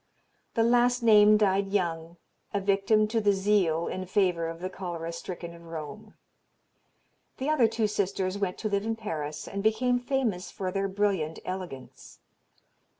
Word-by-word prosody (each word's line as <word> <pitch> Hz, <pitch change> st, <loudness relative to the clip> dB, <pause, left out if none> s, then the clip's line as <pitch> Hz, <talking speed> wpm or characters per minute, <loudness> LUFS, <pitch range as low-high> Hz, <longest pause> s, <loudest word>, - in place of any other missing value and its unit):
The 225 Hz, -, +3 dB
last 245 Hz, +1 st, +3 dB
named 210 Hz, -1 st, +6 dB
died 195 Hz, -1 st, +2 dB
young, 170 Hz, -4 st, -2 dB, 0.4 s
a -, -, +2 dB
victim 200 Hz, +2 st, +2 dB
to 225 Hz, 0 st, +1 dB
the 205 Hz, -1 st, +3 dB
zeal 190 Hz, -5 st, +2 dB
in 185 Hz, 0 st, -4 dB
favor 180 Hz, -4 st, +1 dB
of 165 Hz, 0 st, -6 dB
the 185 Hz, -, -3 dB
cholera 175 Hz, -3 st, -5 dB
stricken 170 Hz, 0 st, -7 dB
of 170 Hz, 0 st, -14 dB
Rome. 165 Hz, +7 st, -8 dB, 1.2 s
The 265 Hz, +3 st, -2 dB
other 285 Hz, -7 st, +4 dB
two 220 Hz, 0 st, -1 dB
sisters 195 Hz, -2 st, -1 dB
went 195 Hz, -3 st, -2 dB
to 220 Hz, -, -3 dB
live 200 Hz, -1 st, 0 dB
in 225 Hz, +1 st, -1 dB
Paris, 155 Hz, -9 st, -5 dB
and 200 Hz, -, -4 dB
became 245 Hz, +4 st, +2 dB
famous 245 Hz, -8 st, -1 dB
for 185 Hz, -1 st, -4 dB
their 195 Hz, +1 st, -1 dB
brilliant 190 Hz, -5 st, 0 dB
elegance. 185 Hz, -8 st, -7 dB
195 Hz, 155 wpm, -28 LUFS, 175-215 Hz, 1.2 s, named